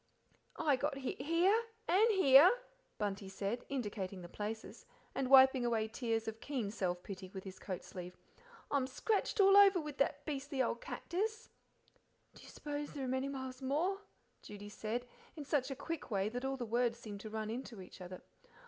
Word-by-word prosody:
"I 295 -5 +3
got 285 +1 -1
hit 265 -1 -4
here 335 +7 +4 0.3
and 395 +7 +5
here," 340 -4 +8 0.5
Bunty 200 -2 -3
said, 200 +4 -3
indicating 205 -8 -4
the - - -7
places, 215 +4 -6 0.3
and 260 -2 -1
wiping 265 -1 +8
away 225 -2 +1
tears 225 -1 -2
of 220 0 -4
keen 250 -8 -2
self 180 -4 -2
pity 190 -1 -7
with 190 - -5
his 190 -1 -9
coat 185 -3 -5
sleeve. 180 -1 -8 0.5
"I'm 275 -3 +2
scratched 420 - -1
all 390 0 +7
over 400 -2 +8
with 300 -3 -6
that 275 - +1
beastly 280 -2 -4
old 235 -2 +1
cactus." 435 +6 -3 0.8
"Do - - -15
you - - -13
suppose 290 0 -5
there 275 -2 -3
are - - -3
many 260 +1 0
miles 260 -1 -6
more?" 330 +9 0 0.4
Judy 205 0 -9
said, 220 +3 -3 0.3
in 300 -3 -7
such 280 -2 +1
a 270 - -3
quick 330 +3 -5
way 200 -2 0
that 245 +3 -4
all 270 0 -1
the 245 - -3
words 235 +1 +1
seemed 210 -4 -8
to 215 - -7
run 215 0 -3
into 240 -2 -6
each 185 0 -11
other. 180 0 -8
255 Hz, 185 wpm, -35 LUFS, 210-290 Hz, 0.8 s, here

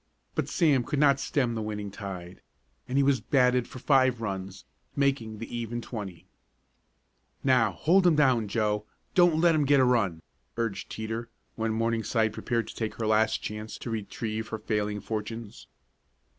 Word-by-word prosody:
But - - -2
Sam 145 -8 +3
could 145 +4 -3
not 140 -1 +4
stem 125 -5 0
the 110 - -3
winning 105 -1 -4
tide, 95 -3 -8 0.5
and 130 - -1
he 140 - +5
was 135 -2 +2
batted 125 -3 +3
for - - -10
five 130 -2 +3
runs, 95 -3 -5 0.3
making 135 -6 0
the 115 +2 -7
even 120 0 -3
twenty. 100 -8 -7 1.2
"Now, 125 -6 +3
hold 180 - +3
'em 170 - +5
down, 130 -7 +3
Joe 105 0 0 0.3
don't 175 -3 +5
let 170 0 +5
'em 155 -2 +2
get 140 0 +4
a 130 - +5
run!" 100 -10 +1 0.3
urged 115 -4 -2
Teeter, 110 +1 -4 0.3
when 110 -1 -1
Morningside 115 -1 0
prepared 115 0 -1
to - - -9
take 110 -2 -3
her 115 - -3
last 110 +1 +2
chance 105 +1 -5
to 120 - -6
retrieve 110 0 -4
her 110 - -4
falling 105 -1 -2
fortunes. 110 +1 -6
115 Hz, 165 wpm, -28 LUFS, 105-130 Hz, 1.2 s, he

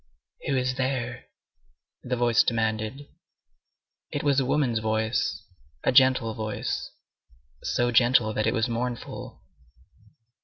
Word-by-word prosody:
"Who 135 - +1
is 130 0 0
there?" 125 -2 -2 0.8
the 125 0 -2
voice 120 -1 +4
demanded. 110 +4 -1 1.0
It - - -3
was 140 -2 +3
a 135 - 0
woman's 130 -5 +1
voice, 110 -1 -1 0.4
a - - +3
gentle 130 -3 +4
voice, 110 0 -3 0.7
so 120 0 0
gentle 120 -2 +4
that 110 - 0
it - - +2
was 115 +2 +1
mournful. 120 0 -5
120 Hz, 115 wpm, -26 LUFS, 110-130 Hz, 1.0 s, voice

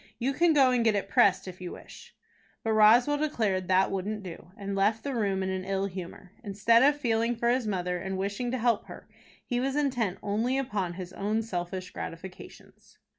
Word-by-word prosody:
You 260 +3 -1
can 335 +3 +3
go 270 -3 +5
and 245 -2 +2
get 220 -2 +3
it 195 -1 -2
pressed 195 -1 +3
if 185 0 -9
you 180 - -6
wish." - - -13 0.5
But 225 - 0
Roswell 235 +7 +5
declared 215 -11 0
that 190 +1 +3
wouldn't 200 +2 -3
do, 175 -1 -9
and 200 -1 -4
left 210 +3 +1
the 280 - -3
room 200 -5 0
in 190 - -2
an 185 0 -3
ill 195 0 -1
humor. 185 -1 -8
Instead 210 +3 +3
of 290 +2 +4
feeling 230 -2 +1
for 235 +1 0
his 250 -2 0
mother, 180 -3 -2
and 190 +1 -4
wishing 200 +5 -2
to 255 - -1
help 235 -2 +1
her, - - -11 0.4
he 245 - -1
was 270 +2 -1
intent 250 -10 0
only 225 +6 0
upon 205 -9 -2
his 180 0 -8
own 215 +3 -1
selfish 185 -2 -5
gratifications. 180 +3 -10
205 Hz, 200 wpm, -28 LUFS, 190-240 Hz, 0.5 s, go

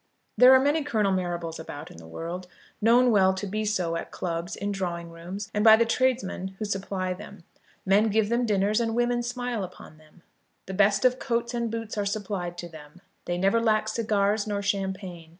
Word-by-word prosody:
There 250 +1 +8
are - - +7
many 290 +3 +2
Colonel 215 -8 +1
Marrables 175 -3 -2
about 155 -1 -8
in - - -13
the 80 0 -12
world, 170 - -6 0.3
known 240 +3 +5
well 190 -3 +4
to 190 - -4
be 215 +2 -2
so 180 -6 0
at 165 - -4
clubs, 170 0 -4
in 205 0 -3
drawing 170 -3 -4
rooms, 185 +6 -7
and 210 - +1
by 220 -1 +9
the 230 +1 +2
tradesmen 230 -6 -1
who 215 - -3
supply 190 -2 -2
them. 200 -1 -11 0.4
Men 205 +3 +4
give 215 0 +2
them 235 +1 +1
dinners 205 +2 +2
and 225 -1 -1
women 240 0 +1
smile 245 -2 -3
upon 175 -4 -11
them. 155 +3 -22 0.4
The 190 - -6
best 200 +3 +3
of 255 0 +3
coats 235 -1 -1
and 235 -1 -1
boots 225 -1 -4
are 205 - 0
supplied 195 -4 -3
to 175 - -6
them. 155 0 -13 0.3
They 175 - -2
never 195 +5 +2
lack 215 -1 +2
cigars 215 -1 0
nor 200 -1 -2
champagne. 190 -4 -3
200 Hz, 200 wpm, -26 LUFS, 180-225 Hz, 0.4 s, by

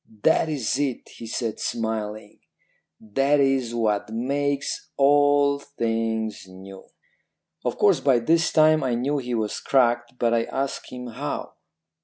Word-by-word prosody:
"'That 160 - +3
is 135 -3 -1
it,' 140 -4 -2
he 115 - -8
said 115 -1 -3
smiling; 110 -2 -4 0.6
'that 135 +7 +1
is 135 -4 +1
what 105 -3 0
makes 140 +4 -2
all 145 0 +4
things 115 -6 -3
new.' 95 +1 -12 0.7
"Of - - -2
course - - +4
by 135 -3 +3
this 165 +8 +2
time 155 -1 +4
I 125 -2 0
knew 140 +5 -1
he 125 -2 -3
was 110 -2 -2
cracked, 120 -2 +1
but 120 -1 +1
I 115 -1 +1
asked 135 +1 -4
him 125 0 -7
how. 120 -2 -5
125 Hz, 140 wpm, -24 LUFS, 115-140 Hz, 0.7 s, all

